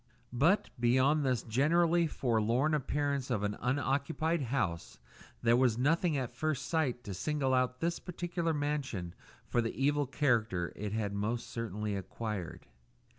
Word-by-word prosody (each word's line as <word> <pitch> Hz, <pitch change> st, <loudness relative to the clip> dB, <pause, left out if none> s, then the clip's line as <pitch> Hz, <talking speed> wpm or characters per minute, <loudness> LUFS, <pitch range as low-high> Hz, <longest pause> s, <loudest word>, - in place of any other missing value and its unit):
But, 160 Hz, -, +3 dB
beyond 130 Hz, +5 st, +3 dB
this 130 Hz, -4 st, +1 dB
generally 165 Hz, +8 st, +3 dB
forlorn 120 Hz, +3 st, +1 dB
appearance 140 Hz, -2 st, -1 dB
of 110 Hz, -5 st, 0 dB
an 105 Hz, 0 st, -1 dB
unoccupied 145 Hz, +5 st, 0 dB
house, 90 Hz, -, -2 dB, 0.5 s
there 115 Hz, -, +5 dB
was 125 Hz, -3 st, +3 dB
nothing 155 Hz, +4 st, +2 dB
at 130 Hz, -3 st, -2 dB
first 140 Hz, +2 st, -2 dB
sight 140 Hz, -7 st, 0 dB
to 100 Hz, -, -5 dB
single 135 Hz, +7 st, 0 dB
out 125 Hz, 0 st, +1 dB
this 170 Hz, +1 st, 0 dB
particular 175 Hz, -1 st, -2 dB
mansion 145 Hz, -, -2 dB, 0.3 s
for 120 Hz, -, +1 dB
the 115 Hz, +2 st, -4 dB
evil 145 Hz, +1 st, +2 dB
character 115 Hz, -, +1 dB
it 105 Hz, 0 st, -4 dB
had 105 Hz, -2 st, -2 dB
most 110 Hz, +4 st, -2 dB
certainly 105 Hz, -2 st, -3 dB
acquired. 95 Hz, -3 st, -5 dB
130 Hz, 140 wpm, -32 LUFS, 110-150 Hz, 0.5 s, there